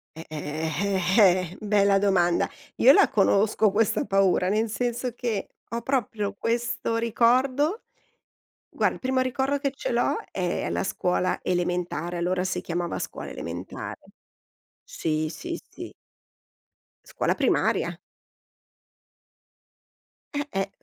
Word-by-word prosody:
Eh, 160 - -9
eh, 155 +1 -3 0.5
eh, 185 -4 +6
eh, - - -11
bella 200 -2 +3
domanda, 180 -4 +2 0.3
io 265 - +8
la - - +6
conosco 210 +1 +3
questa 215 +1 +1
paura, 195 -1 +2
nel 215 +2 +1
senso 240 +1 -2
che, 230 -5 -3 0.2
ho 235 - -2
proprio 225 -6 -1
questo 230 +1 -1
ricordo 255 - +2 1.0
Guar - - +3
il - - -10
primo 260 0 +1
ricordo 265 +2 0
che 275 -1 -1
ce - - -3
l'ho, 240 +1 +1
è 180 -2 -2
la - - -1
scuola 180 -1 0
elementare, 175 -1 -1
allora 180 +1 0
si 185 - -2
chiamava 175 0 -3
scuola - - -6
elementare. 85 +3 -6 0.9
Sì, 155 -1 -2
sì, 340 - -5
sì. - - -9 1.1
Scuola - - -1
primaria. - - +1 2.4
Eh-eh, 285 -10 -2
205 Hz, 115 wpm, -26 LUFS, 180-240 Hz, 2.4 s, io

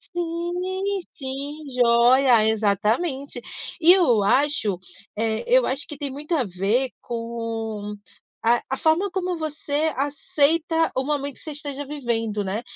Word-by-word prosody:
Sim, 360 +3 -2
sim, 280 +3 -5
joia, 245 -1 +5
exatamente. 220 - 0 0.4
E 340 +1 +8
eu 315 - +4
acho, 240 -4 +2 0.4
eh, 220 0 -1
eu - - +5
acho 270 +2 -1
que 295 - -7
tem 280 -1 -4
muito 300 +5 -3
a 285 - +2
ver 205 +7 0
com 230 -3 -4 0.5
a 235 +1 +4
a 265 - -1
forma 325 +7 +2
como 365 -1 -2
você 310 0 -1
aceita 310 +4 +1
o 260 - 0
momento 285 -2 -2
que - - -19
você 315 - -6
esteja 285 -1 -4
vivendo, 230 -7 -2
né? 200 +3 -2
275 Hz, 135 wpm, -23 LUFS, 230-315 Hz, 0.5 s, E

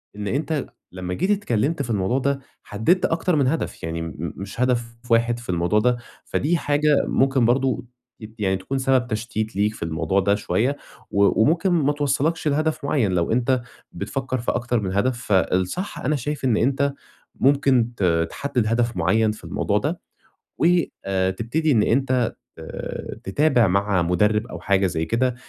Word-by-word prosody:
إن 105 0 -5
أنت 145 +4 -1 0.2
لمّا 90 0 -5
جيت 185 - 0
اتكلمت 150 - 0
في 120 - -4
الموضوع 105 +4 +1
ده، 140 +1 0 0.2
حدَّدت 110 - +1
أكتر 165 +1 +1
من 140 -3 +2
هدف، 160 +5 -2
يعني 80 0 -3
م - - -4
م 80 +1 -6
مش 100 +4 -6
هدف 120 -2 0 0.2
واحد 115 +1 +3
في 120 - -13
الموضوع 90 +3 +2
ده. 125 +2 +2 0.3
فدي 165 +4 0
حاجة 145 -1 +2
ممكن 135 -2 +2
برضه 125 0 +1 0.3
أكيد، 110 0 -11
يعني 95 -2 +1
تكون 95 +9 -4
سبب 130 -1 +2
تشتيت 110 -1 -3
ليك 105 +2 +1
في - - -7
الموضوع 80 +3 0
ده 100 +1 +2
شوية، 125 +6 0 0.3
و 100 +2 +3
وممكن 165 - +3
ما 150 -5 +2
توصَّلكش 145 +3 0
لهدف 155 +1 0
معيَّن 130 -9 +1
لو 85 -2 0
أنت 125 +2 +2 0.3
بتفكِّر 130 -1 -3
في 120 - -1
أكتر 120 0 0
من 95 -3 -3
هدف. 120 +5 +1
فالصح، 95 - 0
أنا 150 +4 0
شايف 145 +1 -3
إن 120 -4 +3
أنت 140 +3 +1 0.4
ممكن 135 -3 +3
ت - - -2 0.3
تحدِّد 125 -6 -1
هدف 115 -1 0
معيَّن 110 +6 +2
في 105 - -10
الموضوع - - -1
ده، - - -2 0.6
وآآ، 95 - +1
تبتدي 120 +11 -1
إن 110 -6 +4
أنت 125 -1 +1 0.2
آآ، - - -6
تتابع 125 +2 +3
مع 100 0 +1
مدرِّب 105 +6 +1
أو - - -8
حاجة 100 -1 +2
زي 80 -2 -2
كده، 125 +4 0
120 Hz, 170 wpm, -23 LUFS, 100-140 Hz, 0.6 s, إن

